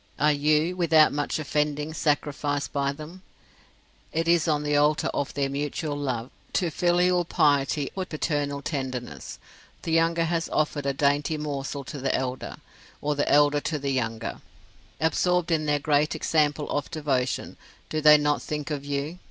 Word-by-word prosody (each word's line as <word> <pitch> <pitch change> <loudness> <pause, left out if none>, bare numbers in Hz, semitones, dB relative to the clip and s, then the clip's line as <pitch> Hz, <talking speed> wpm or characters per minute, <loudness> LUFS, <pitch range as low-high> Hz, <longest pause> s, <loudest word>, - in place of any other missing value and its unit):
Are 150 +1 +4
you, 150 +4 +2
without 165 -4 +4
much 145 0 -1
offending, 150 0 -1
sacrificed 145 -2 -1
by 140 -1 +1
them, 155 +6 -10 0.9
it 165 +1 -1
is 170 -1 +3
on 150 -2 +1
the 150 0 0
altar 150 +2 +3
of 140 - -2
their 140 -1 +1
mutual 145 +2 -3
love, 130 -4 -3 0.2
to 175 -4 +1
filial 175 +2 +2
piety 145 -3 +1
or 190 -1 -2
paternal 145 -3 -2
tenderness: 130 - -5 0.5
the 165 - -3
younger 165 +1 +3
has 165 0 -1
offered 150 -2 0
a 140 - +1
dainty 145 +3 +1
morsel 140 -2 -4
to 140 +2 -7
the 135 0 0
elder, 130 0 -3 0.4
or 150 0 0
the 145 0 0
elder 145 0 +5
to 155 - -2
the 140 -1 -2
younger. 115 -4 -3 0.6
Absorbed 175 +2 +1
in 155 -2 +1
their 145 0 +3
great 150 +1 +1
example 150 -1 +1
of 145 -1 -2
devotion 135 -6 -1 0.3
do 155 - -2
they 150 0 +8
not 145 0 +1
think 150 0 -4
of 145 -2 -3
you. 145 +4 -3
150 Hz, 160 wpm, -26 LUFS, 140-160 Hz, 0.9 s, they